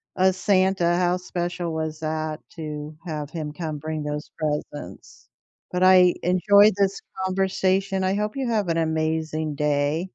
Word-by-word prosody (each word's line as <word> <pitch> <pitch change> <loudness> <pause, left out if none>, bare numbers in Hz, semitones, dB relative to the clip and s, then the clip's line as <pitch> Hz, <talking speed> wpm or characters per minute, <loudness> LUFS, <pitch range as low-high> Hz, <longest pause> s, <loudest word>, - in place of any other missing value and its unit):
a 190 0 +4
Santa, 185 -2 +2
how 180 0 +2
special 175 -1 -3
was 160 -1 -3
that 155 0 -3 0.2
to 150 -2 -6
have 150 -3 -4
him 155 -3 -5
come 155 -1 -5
bring 155 0 -4
those 150 +1 -5
presents. 150 -1 -5 0.4
But 180 0 0
I 185 -1 +6
enjoyed 200 +4 +5
this 195 -1 +1 0.3
conversation. 190 0 0
I 190 +1 +1
hope 210 +2 -2
you 260 -3 -1
have 210 -5 0
an 165 - +1
amazing 160 -1 -1
day. 150 +4 0
170 Hz, 150 wpm, -24 LUFS, 155-185 Hz, 0.4 s, I